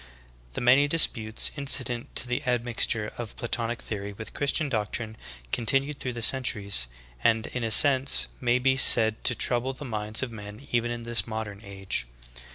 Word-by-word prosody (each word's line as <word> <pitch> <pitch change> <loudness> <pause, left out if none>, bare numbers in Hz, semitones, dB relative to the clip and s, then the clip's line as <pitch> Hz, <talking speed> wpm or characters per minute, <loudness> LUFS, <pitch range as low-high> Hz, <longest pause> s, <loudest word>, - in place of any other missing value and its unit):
The - - -5
many 130 +4 +4
disputes 115 -8 +2
incident 135 -4 -2
to 125 - +2
the 125 0 -3
admixture 120 -3 -1
of 115 -2 -7
Platonic 120 0 -3
theory 100 -1 -6
with 110 +1 -10
Christian 145 +2 -1
doctrine 110 -2 -4 0.4
continued 135 +5 0
through 125 - -5
the 120 -1 -5
centuries, 105 - +3 0.4
and 115 0 +2
in 125 - -5
a 115 - -2
sense 135 +4 +6
may 120 -1 +1
be 130 +1 +1
said 110 -4 +4
to 120 - +1
trouble 125 +3 -1
the 145 +3 -10
minds 110 -1 +1
of 125 - -5
men 105 +3 -11
even 120 0 0
in 120 0 -6
this 120 0 +1
modern 110 -3 -6
age. 95 -10 -5
120 Hz, 165 wpm, -26 LUFS, 110-130 Hz, 0.4 s, sense